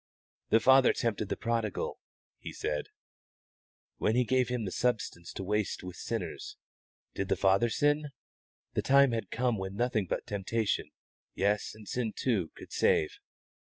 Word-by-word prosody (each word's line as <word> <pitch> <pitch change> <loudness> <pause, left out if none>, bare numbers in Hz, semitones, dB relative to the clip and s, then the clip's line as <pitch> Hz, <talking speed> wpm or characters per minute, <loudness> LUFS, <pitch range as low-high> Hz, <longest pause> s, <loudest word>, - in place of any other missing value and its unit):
"The 110 - +5
father 130 +2 +6
tempted 110 -3 -1
the - - -2
prodigal," 115 -3 -2 0.4
he - - -7
said, 75 -1 -3 1.1
"when 110 - +1
he 125 - +4
gave 130 +1 +2
him 125 -3 -1
the 95 - -3
substance 110 -8 -1
to - - -5
waste 105 0 -1
with 90 -1 -7
sinners. 420 - -5 0.6
Did 100 - -2
the - - +3
father 95 +5 +3
sin? 145 +4 +1 0.6
The - - +1
time 140 -1 +5
had 115 -1 -2
come 120 -2 0
when 95 +1 -5
nothing 110 -3 0
but - - -2
temptation 105 0 -1 0.5
yes, 100 +2 0
and 110 -1 -13
sin 115 -4 -2
too 100 -11 0
could - - -11
save. 75 - +2
110 Hz, 155 wpm, -30 LUFS, 100-125 Hz, 1.1 s, father